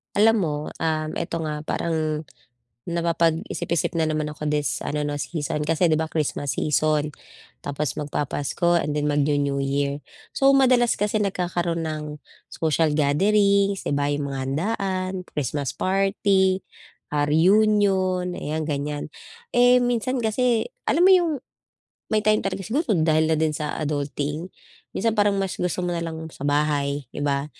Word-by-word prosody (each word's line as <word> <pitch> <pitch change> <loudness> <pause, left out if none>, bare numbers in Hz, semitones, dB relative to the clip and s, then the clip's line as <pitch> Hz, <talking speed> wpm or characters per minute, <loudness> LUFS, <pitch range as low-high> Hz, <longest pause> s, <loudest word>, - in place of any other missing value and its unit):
Alam 225 +2 +5
mo, 160 -6 0 0.2
um, 155 -1 -1
eto 170 -1 -3
nga 150 -1 -3
parang, 155 -2 -1 0.7
napapag-isip-isip 170 0 0
na 160 -2 +1
naman 155 -1 -2
ako 150 0 -4
this 150 -1 -1
ano 150 0 -2
'no 145 - -2
season, 150 0 -3
kasi 160 +3 +1
'di 165 - +3
ba 160 0 0
Christmas 150 -2 -2
season, 150 0 +1 0.5
tapos 145 -2 -3
magpa-Pasko 150 +4 0
and 150 0 -2
then 150 - 0
magnu-New 145 -1 +1
Year. 140 +1 -1 0.3
So 270 - +4
madalas 250 -3 +4
kasi 210 +1 0
nagkakaroon 175 -4 -1
ng, 155 -1 -4 0.4
social 160 0 +1
gatherings, 200 +6 +3
'di - - 0
ba 145 0 +1
'yong 145 0 -1
mga 135 -1 -4
handaan, 185 +6 -1 0.2
Christmas 140 -1 -2
party, 195 0 +1 0.5
ah, 145 0 +1
reunion 185 +1 +3
ayan 155 -1 -3
ganiyan. 145 0 -3 0.5
Eh, 245 +1 +6
minsan 245 +1 0
kasi 235 0 +1 0.2
alam 350 - +4
mo 380 - +7
'yong, 350 -3 +4 0.8
may 215 -1 +1
time 215 0 +4
talaga 195 -1 -3
siguro 275 +6 -1
dahil 155 0 +2
na 160 - +2
din 155 0 +1
sa 150 0 -3
adulting, 150 +2 -3 0.5
minsan 225 +3 +1
parang 205 -2 +2
mas 195 -1 -1
gusto 180 0 -1
mo 175 - -1
na 170 - -2
lang 160 -1 -5
sa - - -15
bahay 145 -1 0
'di - - -5
ba, 140 -1 0
160 Hz, 150 wpm, -24 LUFS, 150-195 Hz, 0.8 s, mo